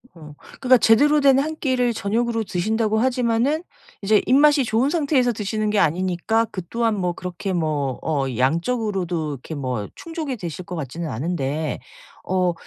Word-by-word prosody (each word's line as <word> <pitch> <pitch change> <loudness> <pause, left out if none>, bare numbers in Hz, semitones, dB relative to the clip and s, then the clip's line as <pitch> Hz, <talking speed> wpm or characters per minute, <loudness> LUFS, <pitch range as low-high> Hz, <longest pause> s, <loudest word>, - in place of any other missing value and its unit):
어. 155 -3 -12 0.3
그러니까 255 -1 +6
제대로 285 +7 +4
된 275 -1 +6
1 310 +3 -2
끼를 250 -4 +1
저녁으로 225 +2 -1
드신다고 215 +3 0
하지만은 250 +5 +1 0.4
이제 210 +1 +4
입맛이 290 +1 +5
좋은 230 +5 +1
상태에서 285 -7 +2
드시는 215 0 -2
게 210 - +2
아니니까 185 +7 +1
그 185 - -4
또한 230 -2 0
뭐 180 -3 -1
그렇게 180 +2 -5
뭐 150 -6 -1
어 145 -4 0
양적으로도 175 - 0
이렇게 140 +4 -8
뭐 125 -7 -3
충족이 320 -5 -5
되실 175 -3 -6
것 180 - -6
같지는 160 +2 -5
않은데 150 +2 -2 0.5
어 180 -1 +1
210 Hz, 345 characters per minute, -22 LUFS, 165-245 Hz, 0.5 s, 그러니까